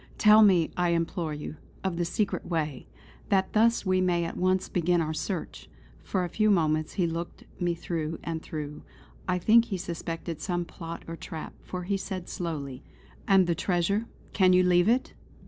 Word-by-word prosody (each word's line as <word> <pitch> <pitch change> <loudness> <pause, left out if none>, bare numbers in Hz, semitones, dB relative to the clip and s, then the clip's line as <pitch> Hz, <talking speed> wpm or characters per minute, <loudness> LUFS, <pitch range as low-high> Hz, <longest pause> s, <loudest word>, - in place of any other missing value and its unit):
Tell 215 0 +7
me, 185 -6 +5
I 175 -1 +1
implore 170 -1 -1
you, 150 +1 -7 0.3
of 190 -2 -1
the 170 0 0
secret 195 +4 -1
way; 155 - -2 0.4
that 190 -1 +2
thus 230 +1 +3
we 185 0 +2
may 175 -2 +2
at 165 - -5
once 185 +1 +1
begin 175 0 +1
our 160 -1 -1
search." 170 +3 -4 0.3
For 185 -2 -1
a - - -1
few 215 +4 +2
seconds 155 -4 +1
he 180 - +1
looked 165 +1 -4 0.2
me 175 -1 +1
through 165 -2 -3
and 165 -1 -3
through; 150 -2 -6 0.5
I 180 -1 +1
think 225 +6 +5
he 195 - -3
suspected 165 -2 -5
some 175 -1 -1
plot 165 0 -8
or 165 - -5
trap, 160 -1 -7
for 180 -1 -6
he 195 +2 0
said 190 -2 -5
slowly: 145 -6 -4 0.5
"And 195 -2 +6
the 170 - +1
treasure; 195 +6 0 0.3
can 185 -2 +5
you 180 0 +5
leave 180 +2 +4
it?" 250 +3 +1
175 Hz, 180 wpm, -28 LUFS, 165-190 Hz, 0.5 s, Tell